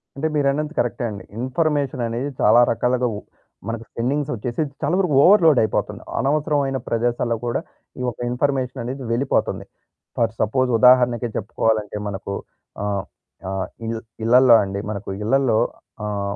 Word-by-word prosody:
అంటే 145 Hz, +3 st, -1 dB
మీరన్నది 150 Hz, +2 st, 0 dB
కరెక్టే 120 Hz, +1 st, -1 dB
అండి. 100 Hz, -2 st, -8 dB, 0.2 s
ఇన్ఫర్మేషన్ 140 Hz, 0 st, 0 dB
అనేది 120 Hz, +5 st, -3 dB
చాలా 120 Hz, -, +6 dB
రకాలుగా 125 Hz, +2 st, +1 dB
ఉప్ -, -, -12 dB, 0.4 s
మనకు 115 Hz, 0 st, -4 dB
స్పేండింగ్స్ 135 Hz, +5 st, -1 dB
వచ్చేసి 120 Hz, +5 st, -3 dB, 0.2 s
చాలా 155 Hz, +4 st, +1 dB
వరకు 180 Hz, -7 st, +1 dB
ఓవర్‌లోడ్ 165 Hz, -8 st, +6 dB
అయిపోతున్నాయి. 110 Hz, -, -2 dB
అనవసరమైన 145 Hz, -1 st, +1 dB
ప్రదేశాల్లో 120 Hz, 0 st, 0 dB
కూడా 120 Hz, -, 0 dB, 0.4 s
ఈ -, -, -4 dB
యొక్క 120 Hz, -, -4 dB
ఇన్ఫర్మేషన్ 130 Hz, 0 st, -1 dB
అనేది 130 Hz, +3 st, -5 dB
వెళ్ళిపోతుంది. 125 Hz, +4 st, 0 dB, 0.5 s
ఫర్ 115 Hz, -1 st, +2 dB
సపోజ్ 130 Hz, +4 st, +1 dB
ఉదాహరణకి 125 Hz, -1 st, +5 dB
చెప్పుకోవాలంటే 110 Hz, 0 st, -1 dB
మనకు 100 Hz, 0 st, -5 dB, 0.5 s
ఆహ్, 100 Hz, -1 st, -1 dB, 0.5 s
ఆహ్, 95 Hz, -1 st, -2 dB, 0.2 s
ఇ -, -, -4 dB, 0.4 s
ఇళ్ళల్లో 125 Hz, +1 st, +6 dB
అండి 100 Hz, 0 st, -4 dB
మనకు 105 Hz, 0 st, -5 dB
ఇళ్లల్లో 125 Hz, 0 st, +2 dB, 0.5 s
ఆహ్, 100 Hz, -1 st, -2 dB
125 Hz, 135 wpm, -22 LUFS, 110-140 Hz, 0.5 s, చాలా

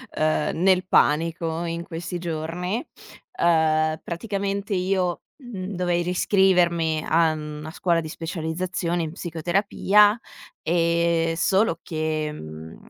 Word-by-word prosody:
ehm, 155 Hz, 0 st, 0 dB
nel 185 Hz, -1 st, +4 dB
panico 165 Hz, +2 st, +2 dB
in 170 Hz, 0 st, -3 dB
questi 170 Hz, +1 st, -5 dB
giorni. 175 Hz, -, -3 dB, 0.5 s
Ehm, 155 Hz, -, +2 dB
praticamente 200 Hz, +2 st, -3 dB
io, 180 Hz, -1 st, 0 dB, 0.2 s
mhmm, 200 Hz, -6 st, -6 dB
dovei 175 Hz, -1 st, 0 dB
riscrivermi 175 Hz, -3 st, +2 dB
a, 160 Hz, -1 st, +3 dB
mhmm, 150 Hz, 0 st, -7 dB
a 160 Hz, -, -6 dB
scuola 170 Hz, -1 st, +1 dB
di 160 Hz, -, -5 dB
specializzazione 170 Hz, +1 st, -3 dB
in 155 Hz, -, -4 dB
psicoterapia. 195 Hz, +5 st, +2 dB, 0.4 s
Ehm, 170 Hz, 0 st, +1 dB
solo 190 Hz, +2 st, +2 dB
che, 155 Hz, -1 st, -2 dB
mhmm, 80 Hz, -, -9 dB
170 Hz, 110 wpm, -24 LUFS, 160-185 Hz, 0.5 s, nel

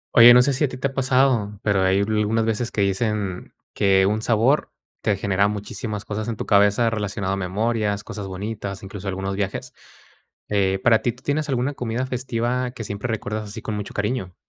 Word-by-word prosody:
Oye, 120 Hz, 0 st, +10 dB
no 125 Hz, -, +7 dB
sé 140 Hz, +2 st, +2 dB
si 135 Hz, -, 0 dB
a -, -, +4 dB
ti 130 Hz, -, -7 dB
te 140 Hz, +2 st, -1 dB
ha -, -, -12 dB
pasado, 130 Hz, -6 st, +2 dB
pero 100 Hz, -2 st, +2 dB
hay 95 Hz, +1 st, +3 dB
a -, -, +2 dB
algunas 110 Hz, +1 st, +1 dB
veces 115 Hz, +2 st, -1 dB
que 105 Hz, -, -1 dB
dicen, 100 Hz, -1 st, -1 dB, 0.2 s
que 95 Hz, -1 st, +3 dB
un 105 Hz, +2 st, +1 dB
sabor 120 Hz, +6 st, +2 dB, 0.3 s
te 100 Hz, -, +1 dB
genera 100 Hz, +1 st, +2 dB
muchísimas 105 Hz, +1 st, -5 dB
cosas 110 Hz, +1 st, -4 dB
en 115 Hz, -, -2 dB
tu -, -, -5 dB
cabeza 105 Hz, +3 st, +4 dB
relacionado 100 Hz, -3 st, -2 dB
a -, -, 0 dB
memorias, 105 Hz, +2 st, -1 dB
cosas 105 Hz, -3 st, -6 dB
bonitas, 100 Hz, +1 st, -5 dB
incluso 100 Hz, 0 st, -7 dB
algunos 95 Hz, +1 st, -3 dB
viajes. 100 Hz, -1 st, -3 dB, 0.8 s
Eh, 95 Hz, -2 st, +1 dB
para 115 Hz, -2 st, +5 dB
ti, 120 Hz, -, 0 dB
¿tú 125 Hz, +3 st, -21 dB
tienes 150 Hz, +1 st, -1 dB
alguna 130 Hz, +1 st, 0 dB
comida 125 Hz, -1 st, -2 dB
festiva 125 Hz, 0 st, -2 dB
que 120 Hz, -3 st, -7 dB
siempre 100 Hz, +2 st, -4 dB
recuerdas 110 Hz, -1 st, -3 dB
así 110 Hz, +1 st, -8 dB
con 110 Hz, -, -3 dB
mucho 105 Hz, -1 st, -6 dB
cariño? 105 Hz, -3 st, -2 dB
105 Hz, 205 wpm, -23 LUFS, 100-120 Hz, 0.8 s, Oye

